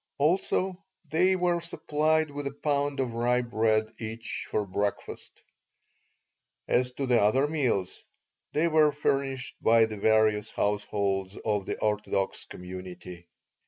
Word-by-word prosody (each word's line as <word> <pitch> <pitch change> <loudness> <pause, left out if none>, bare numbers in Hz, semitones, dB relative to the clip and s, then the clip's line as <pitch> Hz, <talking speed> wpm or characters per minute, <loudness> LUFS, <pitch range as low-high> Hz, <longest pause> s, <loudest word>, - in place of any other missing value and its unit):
Also, 185 +4 +1 0.2
they 175 +5 +3
were 175 -1 +1
supplied 155 -2 0
with 145 0 -4
a - - -3
pound 145 -1 +1
of 125 -3 -1
rye 120 +1 +1
bread 110 -2 +1
each 115 0 -5
for 105 - 0
breakfast. 100 +1 -4 1.2
As 125 0 +2
to 135 +2 -3
the 125 -3 +3
other 130 +8 +3
meals, 130 - -1 0.5
they 155 +3 +2
were 155 -2 +4
furnished 135 -3 -2
by 115 0 +5
the 110 -1 -6
various 110 0 +3
households 100 -1 -1
of 105 -3 0
the - - -2
orthodox 105 -2 -1
community. 90 -1 -9
120 Hz, 125 wpm, -28 LUFS, 105-145 Hz, 1.2 s, by